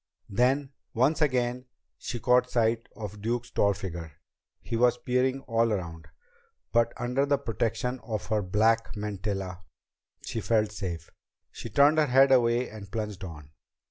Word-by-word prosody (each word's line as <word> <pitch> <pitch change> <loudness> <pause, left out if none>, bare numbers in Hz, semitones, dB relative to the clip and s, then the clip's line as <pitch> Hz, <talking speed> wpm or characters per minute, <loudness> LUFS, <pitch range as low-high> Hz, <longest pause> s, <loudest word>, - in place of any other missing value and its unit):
Then, 130 +6 +2 0.2
once 135 +8 +2
again, 125 -3 +1 0.3
she 120 - -5
caught 125 +1 +3
sight 115 -1 +1
of 105 -2 -7
Duke's 120 +2 -2
tall 100 -1 +2
figure. 85 -5 -6 0.5
He - - -5
was 120 +1 +3
peering 130 +2 0
all 115 -2 +1
around. 85 -5 -4 0.6
But 115 0 +3
under 125 +3 0
the 140 0 +3
protection 125 +1 -2
of 110 -3 -4
her 110 -2 +1
black 110 +5 +1
mantilla, 100 -3 -4 0.6
she 115 - -3
felt 110 -2 +1
safe. 85 -5 -5 0.4
She 115 - -8
turned 145 +7 +5
her 150 - +3
head 135 +1 +5
away 120 -1 +3
and 105 -2 -10
plunged 105 -4 -4
on. 75 -5 -9
115 Hz, 145 wpm, -28 LUFS, 105-125 Hz, 0.6 s, turned